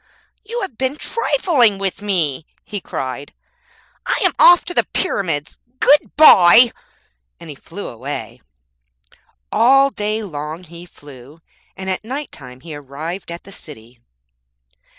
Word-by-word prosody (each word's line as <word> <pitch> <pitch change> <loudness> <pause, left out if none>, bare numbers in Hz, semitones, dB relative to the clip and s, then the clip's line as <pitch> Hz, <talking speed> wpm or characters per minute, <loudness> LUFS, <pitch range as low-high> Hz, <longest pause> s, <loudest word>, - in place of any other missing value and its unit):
'You 470 +3 -5
have 325 - -7
been 260 +2 -1
trifling 285 - +1
with 195 0 -4
me,' 165 -8 -1 0.2
he 205 -3 -6
cried, 135 -1 -6 0.7
'I - - 0
am - - +4
off 350 0 +7
to 355 - -5
the - - +2
Pyramids. 170 - -2 0.2
Good 290 +3 +3
bye!' 235 - +7 0.7
and 165 -2 -10
he - - -10
flew 185 +8 -9
away. 130 +5 -7 1.1
All 270 +5 +4
day 215 0 -3
long 155 -1 -7
he 170 +1 -13
flew, 145 -1 -15 0.4
and 190 - -7
at 190 +1 -3
night 275 +6 -6
time 125 -1 -13
he 160 +1 -9
arrived 150 +6 -7
at 170 - -8
the 195 - -14
city. 125 - -13
185 Hz, 135 wpm, -18 LUFS, 145-245 Hz, 1.1 s, off